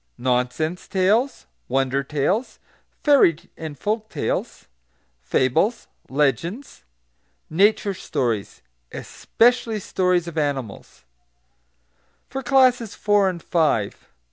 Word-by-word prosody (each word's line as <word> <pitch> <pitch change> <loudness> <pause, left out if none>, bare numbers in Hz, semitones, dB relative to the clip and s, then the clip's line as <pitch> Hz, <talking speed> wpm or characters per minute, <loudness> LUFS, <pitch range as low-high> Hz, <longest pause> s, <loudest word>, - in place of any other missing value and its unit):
Nonsense 125 +7 -1
Tales 210 +8 +1 0.2
Wonder 135 0 +1
Tales 150 - -1 0.5
Fairy 280 - +5 0.2
and 155 -3 -7
Folk 215 - -2
Tales - - -3 0.6
Fables 130 - +1 0.2
Legends 150 - -1 0.7
Nature 200 +3 +3
Stories 120 - -3 0.3
(especially 230 -2 +1
stories 180 -2 0
of 165 -2 -3
animals) 135 - -4 1.3
FOR 270 - -3
CLASSES 250 -4 +3
IV. - - -14
AND 195 -4 +3
V. 145 - +1
175 Hz, 90 wpm, -22 LUFS, 135-215 Hz, 1.3 s, Fairy